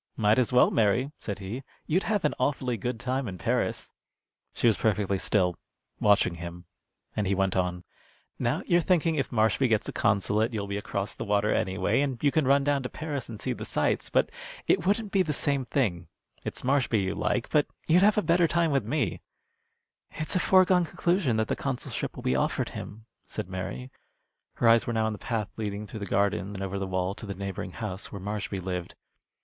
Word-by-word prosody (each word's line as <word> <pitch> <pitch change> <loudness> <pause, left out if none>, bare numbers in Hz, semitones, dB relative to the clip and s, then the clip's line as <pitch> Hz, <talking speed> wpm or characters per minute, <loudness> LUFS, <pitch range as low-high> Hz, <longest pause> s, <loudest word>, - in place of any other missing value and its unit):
"Might 105 +1 +4
as 125 - +1
well, 125 0 +5
Mary," 115 +6 +2
said 100 - -4
he. 100 +6 -5 0.2
"You'd 175 +5 +2
have 205 -6 +1
an 150 - +2
awfully 130 -2 0
good 115 +2 -3
time 130 +1 -1
in 95 -2 -5
Paris." 85 - -1 0.6
She - - -3
was 115 -3 +6
perfectly 100 -3 +1
still, 90 -4 +2 0.4
watching 100 -4 +4
him, 85 +1 -8 0.5
and 105 -2 0
he 100 - +2
went 95 0 +1
on: 90 -1 -1 0.6
"Now - - 0
you're 175 0 +3
thinking 165 -2 +2
if 140 -4 -1
Marshby 110 +3 +3
gets 110 -2 +1
the - - -3
consulate 105 +3 +2
you'll 100 -2 -2
be 100 0 -3
across 100 0 -3
the - - -5
water 105 0 +2
anyway, 100 +4 +1
and 135 -3 -1
you 145 - +4
could 155 -3 +1
run 140 +1 +5
down 145 -1 +1
to 125 - -4
Paris 145 -5 -5
and 110 -3 -7
see - - -1
the - - -7
sights. - - 0
But - - +2 0.3
it 180 - +2
wouldn't 205 +1 +1
be 195 - +3
the 155 -5 0
same 140 -1 +1
thing. 100 -10 0 0.4
It's - - -5
Marshby 130 -4 +2
you 95 +1 -1
like, 125 - -1
but 150 -2 +3 0.2
you'd 170 +3 +5
have 210 +1 +5
a 210 - +3
better 170 0 +4
time 165 +1 +2
with 135 -4 +2
me." 115 - -1 0.9
"It's 155 +3 -3
a - - +4
foregone 185 0 +5
conclusion 170 - +1
that 110 -1 +1
the - - 0
consulship 135 -3 -3
will - - -8
be 65 - +1
offered 65 - 0
him," 110 +2 -8 0.2
said - - -5
Mary. 95 +7 -5 0.6
Her 120 - +2
eyes 115 0 +5
were 120 - -1
now 110 -1 +1
on 110 - 0
the 105 - -8
path 110 -4 -2
leading 105 -1 -3
through 110 - -8
the 100 - -5
garden 100 0 0
and 95 - -4
over 95 0 -3
the 95 - -2
wall 95 0 -1
to 105 - -9
the 100 - -4
neighboring 95 -1 -5
house 100 -4 -5
where 100 - -6
Marshby 100 0 -3
lived. 90 -1 -4
110 Hz, 210 wpm, -28 LUFS, 100-140 Hz, 0.9 s, was